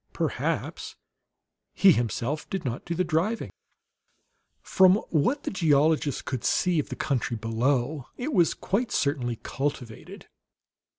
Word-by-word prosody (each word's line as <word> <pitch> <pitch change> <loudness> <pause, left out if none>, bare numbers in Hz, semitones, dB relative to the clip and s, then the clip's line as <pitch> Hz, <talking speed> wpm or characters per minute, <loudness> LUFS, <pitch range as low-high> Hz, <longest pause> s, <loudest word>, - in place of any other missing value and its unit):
Perhaps - - -3 0.8
he 195 - +7
himself 120 +3 -1
did 190 -5 -4
not 120 0 -4
do 170 - -3
the 185 - +1
driving. 175 +7 -1 1.1
From 185 0 +5 0.2
what 245 - +1
the - - -3
geologist 155 -4 +2
could 130 -4 -4
see 180 -3 +2
of 150 - -3
the - - -5
country 125 -4 -1
below, 125 +5 -1
it 285 +5 -3
was 175 -6 +3
quite 225 +5 -1
certainly 130 -4 0
cultivated. 135 -5 -5
150 Hz, 125 wpm, -26 LUFS, 125-180 Hz, 1.1 s, he